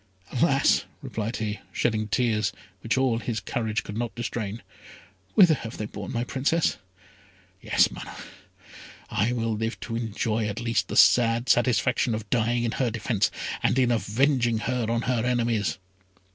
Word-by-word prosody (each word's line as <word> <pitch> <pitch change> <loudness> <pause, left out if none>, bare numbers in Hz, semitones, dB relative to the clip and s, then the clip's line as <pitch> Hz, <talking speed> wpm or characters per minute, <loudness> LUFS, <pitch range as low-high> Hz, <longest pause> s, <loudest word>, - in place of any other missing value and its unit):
"Alas!" - - +3 0.2
replied 110 +2 -3
he, 105 -1 -3
shedding 110 -2 0
tears, 110 -2 +1 0.3
which 115 +5 0
all 130 -3 +2
his 115 -2 -3
courage 110 +2 -2
could 105 - -7
not 120 0 -2
restrain, 115 -2 -4 0.7
"whither 180 -5 +7
have 115 -6 -6
they 105 - -3
borne 100 -2 -7
my 120 - -1
Princess? 140 +5 0 0.8
Yes, - - +3
Mana! - - -8 1.0
I 110 +5 +1
will 115 -2 -1
live 110 +2 -3
to 115 - -4
enjoy 110 -1 -1
at 105 +1 -4
least 115 -1 0
the - - -3
sad 120 0 +5
satisfaction 120 -1 +2
of 110 -1 -6
dying 120 0 +1
in 115 - 0
her 125 0 0
defence, 110 -2 0 0.3
and 120 - +2
in 125 -2 +3
avenging 120 +2 +2
her 125 0 -1
on 115 0 0
her 120 -2 0
enemies!" 115 -8 0
115 Hz, 155 wpm, -26 LUFS, 110-120 Hz, 1.0 s, whither